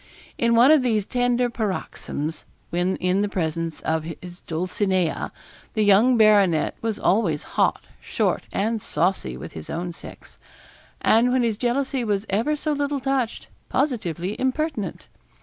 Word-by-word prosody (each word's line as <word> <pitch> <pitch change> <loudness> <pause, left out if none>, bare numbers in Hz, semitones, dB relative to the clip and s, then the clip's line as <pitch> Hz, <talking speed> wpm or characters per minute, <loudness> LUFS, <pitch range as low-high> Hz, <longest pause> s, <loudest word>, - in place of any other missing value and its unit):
In 235 0 +3
one 245 +5 +7
of 310 -3 +6
these 220 -5 +1
tender 245 0 +1
paroxysms, 185 -8 -4 0.3
when 175 +2 0
in 185 +2 +1
the 205 - 0
presence 165 -3 -2
of 160 0 -1 0.2
his 180 0 -11
Dulcinea, 180 +1 -1 0.4
the 215 - +2
young 215 +5 +5
baronet 205 -7 +4
was 225 -2 -2
always 180 -9 +1
hot, - - +2 0.2
short, - - -1
and 220 +2 -1
saucy 65 - -1
with - - -9
his 80 - -9
own 175 +1 -3
sex; - - -13 0.6
and 235 +3 +4
when 255 -1 +2
his 230 -2 +1
jealousy 260 +1 0
was 205 -2 -1
ever 230 +10 +1
so 305 +1 -2
little 285 0 -1
touched, 265 -3 -1 0.2
positively 210 - -1
impertinent. 260 - -2
215 Hz, 145 wpm, -23 LUFS, 180-245 Hz, 0.6 s, one